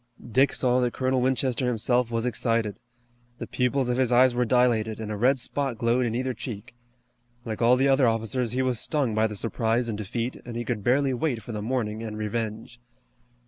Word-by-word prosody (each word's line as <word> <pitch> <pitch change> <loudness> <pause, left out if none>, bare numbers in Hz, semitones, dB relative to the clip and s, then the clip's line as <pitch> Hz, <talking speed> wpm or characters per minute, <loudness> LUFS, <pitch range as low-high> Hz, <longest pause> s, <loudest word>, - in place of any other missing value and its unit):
Dick 135 +4 +4
saw 125 -1 +2
that 125 -1 0
Colonel 130 -1 +1
Winchester 130 -1 0
himself 120 +1 +1
was 115 0 -1
excited. 115 -3 -1 0.6
The - - -5
pupils 125 +1 0
of 125 0 0
his 130 -2 +1
eyes 125 +1 +5
were 125 0 +1
dilated, 115 -3 +2
and 110 -1 -5
a - - -2
red 125 +6 +3
spot 135 0 -2
glowed 120 +2 +1
in 115 - -2
either 130 +1 -1
cheek. 110 -2 -8 0.7
Like 110 -1 -4
all 120 +2 +5
the 135 +2 +2
other 135 -2 +4
officers 115 +1 -1
he 130 +1 +1
was 125 -3 0
stung 140 -8 -1
by 110 +1 +2
the 105 - -6
surprise 115 +2 0
and 105 - -3
defeat, 115 +4 -3
and 120 -1 -8
he 120 - -3
could 110 -3 -3
barely 135 +3 +2
wait 125 -3 -2
for 120 - -7
the 105 -2 -4
morning 110 -2 -2
and 110 -2 -5
revenge. 110 +2 -4
120 Hz, 205 wpm, -26 LUFS, 110-130 Hz, 0.7 s, eyes